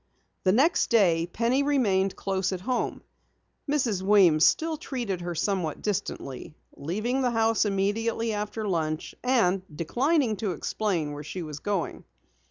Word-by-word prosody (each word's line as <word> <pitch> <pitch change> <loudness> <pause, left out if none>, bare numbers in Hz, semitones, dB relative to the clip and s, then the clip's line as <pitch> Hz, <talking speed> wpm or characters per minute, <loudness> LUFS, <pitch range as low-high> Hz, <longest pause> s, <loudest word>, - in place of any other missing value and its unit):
The 185 - +5
next 280 - +3
day 175 -7 +3
Penny 240 +6 +1
remained 205 -10 +1
close 190 -1 -1
at 185 -2 -4
home. 250 +5 -2 0.7
Mrs. 250 -10 +1
Weems 190 -6 +5
still 320 - +3
treated 240 - -4
her 175 0 -4
somewhat 180 -3 -1
distantly, 180 -8 -4 0.2
leaving 215 - -2
the 250 - +2
house 225 -1 +2
immediately 220 +3 0
after 210 +1 -3
lunch 155 -4 -2
and 225 -8 +2
declining 240 - +1
to 200 -4 -2
explain 170 -2 -2
where 145 0 -7
she 175 +4 -5
was 150 -2 -7
going. 200 -1 -3
205 Hz, 140 wpm, -27 LUFS, 175-235 Hz, 0.7 s, The